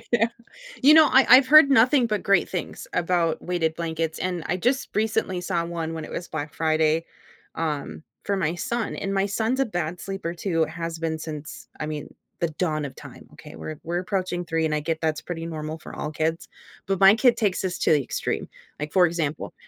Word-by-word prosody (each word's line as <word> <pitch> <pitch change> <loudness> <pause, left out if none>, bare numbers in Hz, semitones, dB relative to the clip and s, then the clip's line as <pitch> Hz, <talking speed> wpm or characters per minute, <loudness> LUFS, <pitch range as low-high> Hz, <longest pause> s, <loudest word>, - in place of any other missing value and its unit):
Yeah. 230 -1 +4 0.6
You 295 +3 +8
know, 315 -1 +8
I 265 0 +6
I've 255 +2 +8
heard 300 0 +8
nothing 250 0 +5
but 210 -2 -2
great 200 - +3
things - - -5
about 170 -2 0
weighted 165 -3 0
blankets, 165 -1 -3
and 180 -3 -2
I 180 - 0
just 255 +7 0
recently 215 -4 0
saw 170 -1 -1
one 165 -1 -4
when 160 - -5
it - - -9
was 175 - -5
Black 150 -2 -5
Friday, 160 0 +1 0.5
um, 145 - -3 0.2
for 200 - 0
my 165 -3 0
son, 235 +6 -3
and 195 0 -3
my 195 0 +2
son's 225 +6 -1
a 270 - +2
bad 175 -4 -3
sleeper 195 -3 -5
too, 170 -2 0
has 165 +1 -5
been 160 -1 -2
since, 155 -1 -8
I 155 - -2
mean, 150 -1 -6 0.3
the 170 - +1
dawn 155 -2 -2
of 140 - -6
time, - - -12
okay? - - -13
We're 80 0 -7
we're 170 +2 -2
approaching 185 -2 -2
3, 165 -1 -1
and 155 -1 0
I 150 - 0
get 160 +1 -2
that's 155 -2 -1
pretty 165 -2 -5
normal 155 -1 -5
for - - -11
all 150 - -4
kids, 160 +2 -2 0.4
but 195 -1 -1
my 195 +1 +8
kid 235 +1 +4
takes 205 -5 0
this 180 -2 -3
to - - +3
the 145 - +3
extreme, - - -3 0.3
like, 150 0 -4
for 180 -2 +5
example, 165 -3 -3
170 Hz, 210 wpm, -24 LUFS, 160-195 Hz, 0.6 s, You